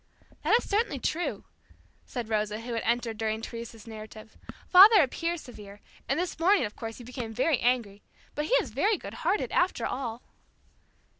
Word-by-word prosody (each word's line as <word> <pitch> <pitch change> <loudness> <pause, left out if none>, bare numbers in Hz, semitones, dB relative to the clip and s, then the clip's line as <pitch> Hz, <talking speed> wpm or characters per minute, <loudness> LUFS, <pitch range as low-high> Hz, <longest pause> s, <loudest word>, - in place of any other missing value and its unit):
"That - - +4
is - - -5
certainly 415 -7 0
true," 325 +7 -2 0.6
said 245 -4 -5
Rosa, 215 0 -1
who 240 +1 -5
had 230 - -1
entered 235 -2 -1
during 220 0 -1
Teresa's 230 -1 -8
narrative. 220 -1 -10 0.3
"Father 400 +4 +9
appears 335 +5 -2
severe, 210 -5 -12 0.3
and 275 +4 +1
this 355 -2 -3
morning, 375 - +4
of 210 - -7
course, 225 -1 -7
he 245 - -10
became 240 -2 -6
very 275 +2 +2
angry, 230 -5 0 0.3
but 295 - -2
he 485 - -2
is 295 - +1
very 390 - +1
good - - -9
hearted 425 - 0
after 360 +1 +1
all." 240 -3 -4
240 Hz, 170 wpm, -28 LUFS, 220-330 Hz, 0.6 s, Father